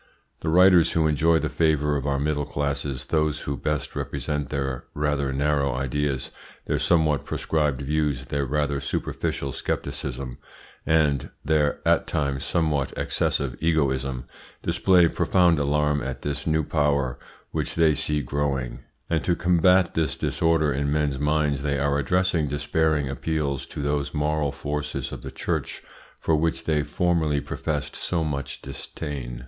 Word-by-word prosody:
The 80 - -2
writers 90 0 +6
who 80 -1 +2
enjoy 80 +2 +3
the - - 0
favour 75 -2 +2
of 70 0 -2
our 70 -1 +1
middle 75 0 -1
classes, 70 -2 -2
those 75 -1 0
who 70 - -3
best 75 +2 -2
represent 75 -2 -3
their 65 -3 -3
rather 75 -2 0
narrow 70 -1 +1
ideas, 70 +1 -1 0.3
their - - 0
somewhat 80 -4 +2
prescribed 75 -4 -1
views, 75 -2 0
their 70 0 -1
rather 75 0 0
superficial 70 0 -2
scepticism, 65 -2 -4 0.5
and 75 -4 +2 0.2
their 75 -2 +1
at - - +3
times 70 -4 -1
somewhat 75 -5 0
excessive 70 -3 0
egoism, 70 -5 0 0.4
display 90 -3 +4
profound 85 -1 +3
alarm 75 0 +1
at 65 0 -5
this 75 +1 -3
new 80 0 +2
power 70 -4 +1 0.3
which - - -2
they 80 -2 +4
see 75 +1 0
growing; 70 -1 -2 0.3
and 80 -1 0
to 90 - +2
combat 90 +1 +4
the 80 -1 +2
disorder 80 -3 +1
in 70 +2 -1
men's 75 -3 0
minds 75 -1 +1
they 70 0 0
are 70 +1 +1
addressing 85 +2 +1
despairing 75 +1 +1
appeals 70 0 -2
to 70 - -5
those 70 +1 -1
moral 75 -1 +1
forces 70 -1 -4
of - - -7
the - - -6
Church - - -3 0.4
for 80 - +2
which 80 +1 0
they 75 -2 +1
formerly 80 -2 +1
professed - - -3
so 85 -2 -1
much 70 -2 -4
disdain. 70 -2 -6
75 Hz, 145 wpm, -25 LUFS, 70-80 Hz, 0.5 s, writers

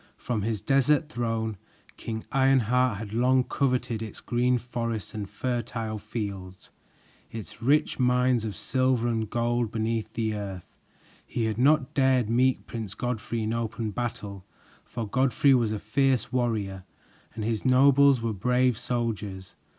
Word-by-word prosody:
From 120 -4 -2
his 110 0 -2
desert 145 +3 +2
throne, 115 -5 -2 0.4
King 110 -1 -5
Ironheart 130 -3 +3
had 105 -1 -7
long 125 +2 +3
coveted 125 -3 -1
its 110 -2 -7
great 125 +1 +1
forests 115 -3 -4
and 105 -3 -5
fertile 115 -1 -3
fields, 100 -4 -6 0.6
its 115 -3 -8
rich 140 +5 +2
mines 125 -1 +3
of 105 -3 -4
silver 130 -2 +1
and 110 -3 -1
gold 120 -1 0
beneath 110 0 -2
the 110 -1 -1
earth. 100 -4 -5 0.6
He 115 - -2
had 110 0 -2
not 140 0 +3
dared 130 -4 +2
meet 130 +2 +2
Prince 110 -4 -6
Godfrey 120 -2 -3
in 110 +1 -1
open 115 -1 -3
battle, 100 -4 -5 0.4
for 115 -3 -5
Godfrey 135 +4 +3
was 120 -4 +2
a 110 - -1
fierce 125 +2 0
warrior 105 -7 -1 0.5
and 110 - -4
his 110 -1 -1
nobles 135 0 +5
were 115 -1 -1
brave 125 +3 +1
soldiers. 105 -6 -3
115 Hz, 145 wpm, -27 LUFS, 110-125 Hz, 0.6 s, nobles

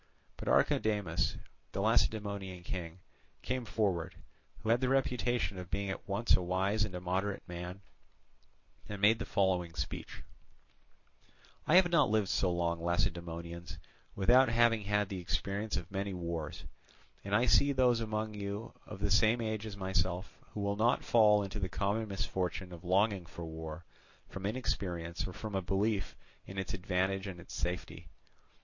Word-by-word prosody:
But - - -8
Archidamus, 100 -7 +2 0.4
the - - -2
Lacedaemonian 100 -4 0
king, 85 -1 -5 0.5
came 125 -1 -2
forward, 100 -7 0 0.5
who 110 - -2
had 120 +2 +4
the 130 - +2
reputation 120 -7 +1
of 90 -1 -8
being 100 0 -1
at - - -7
once 100 +4 +3
a - - +1
wise 95 +4 +1
and 100 -3 -3
a - - -3
moderate 95 +3 -2
man, 90 +2 -6 1.1
and 105 -1 -5
made 110 +3 +5
the - - -3
following 90 -4 +1
speech: 70 -1 -5 1.4
"I 160 - +5
have 180 -1 +6
not 170 - +5
lived 105 -3 +2
so 90 - +2
long, 85 -1 0
Lacedaemonians, 85 -1 -2 0.4
without 120 +6 +5
having 115 -1 +4
had 105 0 +1
the 95 -1 -4
experience 100 +4 -1
of 85 +2 -6
many 100 0 -2
wars, 85 -3 -4 0.6
and 100 +1 0
I 120 +4 +4
see 140 +2 +5
those 125 -3 +3
among 110 -1 -2
you 100 +2 -5
of 105 -2 -8
the 100 -1 +1
same 110 +4 +5
age 110 -1 -2
as 100 -2 -7
myself, 95 -1 -1 0.2
who 105 - -2
will 100 0 0
not 115 +3 +3
fall 105 -3 +5
into 100 +2 -5
the 95 -2 -1
common 100 +3 0
misfortune 95 -2 -2
of 85 0 -10
longing 95 0 +2
for 85 0 -7
war 80 0 -7 0.4
from 95 0 -4
inexperience 90 -7 -2
or 95 - -7
from 110 +1 -6
a 95 - +1
belief 95 +1 0 0.3
in 95 - -8
its 95 -1 -3
advantage 95 +1 0
and 90 -3 -6
its 85 - -11
safety. 90 +1 -4
100 Hz, 160 wpm, -33 LUFS, 90-110 Hz, 1.4 s, have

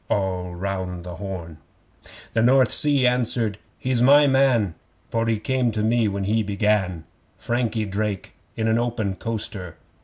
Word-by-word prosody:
(All 90 -3 -1
round 90 -1 -4
the 90 -2 -8
Horn!) 85 -5 -7 0.7
The 115 - +2
North 130 +1 +4
Sea 145 -3 +2
answered: 120 -4 +1 0.2
'He's 125 -2 0
my 145 +4 +7
man, 130 - +3 0.4
For 115 0 0
he 115 -1 +1
came 125 +2 0
to 105 - -1
me 115 0 +2
when 100 -1 -2
he 110 +3 +1
began 100 -4 0 0.3
Frankie 115 -2 -1
Drake 100 -1 -3 0.2
in 110 0 -1
an 110 +1 +2
open 115 -5 -1
coaster. 95 -5 -4
110 Hz, 150 wpm, -23 LUFS, 95-120 Hz, 0.7 s, my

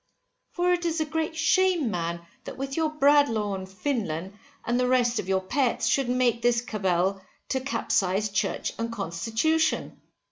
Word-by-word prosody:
For 360 0 +2
it 350 0 -1
is 335 -1 0
a 315 - +1
great 320 +1 -2
shame 340 - +2
man, 170 -1 -3 0.2
that - - -7
with 270 +1 -4
Bradlaugh 285 -9 +3
and 190 -1 -5
Finlen, 190 - -3 0.3
and 240 +1 +1
the 250 - +2
rest 245 -1 +2
of 185 - -5
your 190 0 +2
Pets, 250 +6 0
should 270 -3 +1
make 245 -2 +2
this 240 0 +2
cabal, 190 -4 0 0.3
to 265 - 0
capsize 210 -6 0
church 200 0 -1
and 230 0 -2
constitution. 230 - -1
240 Hz, 155 wpm, -26 LUFS, 195-290 Hz, 0.3 s, Bradlaugh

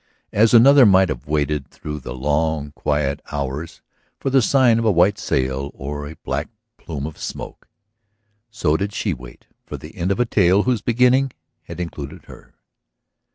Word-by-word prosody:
As 110 +2 +4
another 135 +4 +8
might 95 -1 +5
have - - -5
waited 75 -1 -1
through 75 0 -7
the 60 -2 -7
long, 75 +2 -1
quiet 75 -1 -1
hours 70 +2 -4 0.4
for 135 - -2
the 135 0 +5
sign 120 -1 +4
of 115 - -1
a - - +4
white 95 +3 +3
sail 65 +1 -1
or 75 +1 -6
a 80 - -10
black 75 +3 -2 0.3
plume 75 -5 -6
of 80 -1 -8
smoke, - - -7 0.8
so 85 -9 0
did 100 +4 -2
she - - -1
wait - - -12 0.2
for - - -7
the 75 +6 -12
end 90 0 -1
of 100 - -1
a 125 - +3
tale 100 -2 +3
whose 125 -4 0
beginning 125 +3 +2 0.3
had - - -9
included 75 -5 -6
her. - - -15
80 Hz, 170 wpm, -21 LUFS, 75-110 Hz, 0.8 s, another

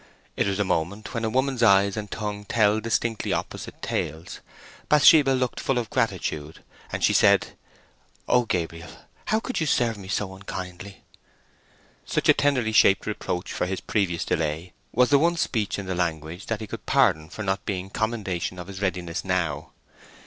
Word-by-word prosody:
It - - +1
was 100 -1 -1
a 105 - +2
moment 100 +5 -2
when 115 -2 -2
a 110 - +1
woman's 130 +1 0
eyes 100 -3 +5
and 105 -1 -5
tongue 105 -1 -4
tell 110 -1 +3
distinctly 115 0 -1
opposite - - -5
tales. 80 +2 -3 0.5
Bathsheba 150 -1 +7
looked 130 -2 0
full 135 - 0
of 115 -3 -2
gratitude, 75 0 -2 0.3
and - - -3
she - - +4
said:— - - +4 0.8
"Oh, 125 -1 +3
Gabriel, 85 -4 -3 0.4
how 220 - +1
could 255 +2 -3
you 160 - 0
serve 115 -6 +1
me 95 - -10
so 100 -1 -2
unkindly!" 95 0 -8 1.0
Such - - -1
a - - +10
tenderly 140 -6 +1
shaped 100 -2 +5
reproach 90 0 -3
for 90 - -1
his 95 0 -3
previous 90 -6 -1
delay 80 +3 -2 0.2
was 125 +3 +3
the 140 - +6
one 170 +3 +2
speech 110 -9 -1
in 100 - -5
the 95 - -2
language 85 0 -3
that 115 -1 -2
he - - -4
could - - -8
pardon 80 0 +3
for 110 - -6
not 95 -1 -1
being 95 -1 -3
commendation 100 -6 -2
of 90 - -6
his 95 0 -8
readiness 90 -2 -2
now. 85 -6 -1
100 Hz, 175 wpm, -25 LUFS, 90-115 Hz, 1.0 s, a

